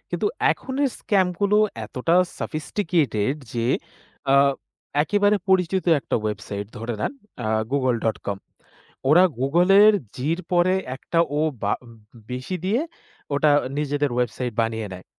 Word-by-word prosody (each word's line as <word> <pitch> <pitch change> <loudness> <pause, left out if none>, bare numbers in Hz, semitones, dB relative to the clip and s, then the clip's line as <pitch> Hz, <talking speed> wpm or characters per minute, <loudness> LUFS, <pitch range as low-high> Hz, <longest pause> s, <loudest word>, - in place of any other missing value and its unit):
কিন্তু - - -1 0.2
এখনের 270 +1 -1
scam 195 -3 +2
গুলো 205 +1 +3 0.3
এতটা 135 +10 0 0.2
sophisticated 155 - -1 0.2
যে, 115 -1 -1 0.6
অ্যা 135 0 +5 0.6
একেবারে 205 +4 +2
পরিচিত 190 0 +2 0.2
একটা - - -1
website 100 -1 -5
ধরে 115 +1 -4
নেন, - - -1 0.3
অ্যা 110 -3 -2 0.2
google.com, 115 -7 0 0.7
ওরা 165 +5 +7 0.2
Google-এর 180 +10 +5 0.2
G-র 160 +7 -1
পরে 180 +1 +4 0.2
একটা 165 - -2 0.2
O - - +2 0.2
বা 100 - +1
উ - - -15
উম 115 - -13 0.4
বেশি 130 +9 -4
দিয়ে 215 +8 +1 0.5
ওটা 150 +1 +3 0.3
নিজেদের 145 -1 0
website 125 0 -2
বানিয়ে 110 -1 -2
নেয়। 90 - -11
145 Hz, 125 wpm, -23 LUFS, 120-185 Hz, 0.7 s, ওরা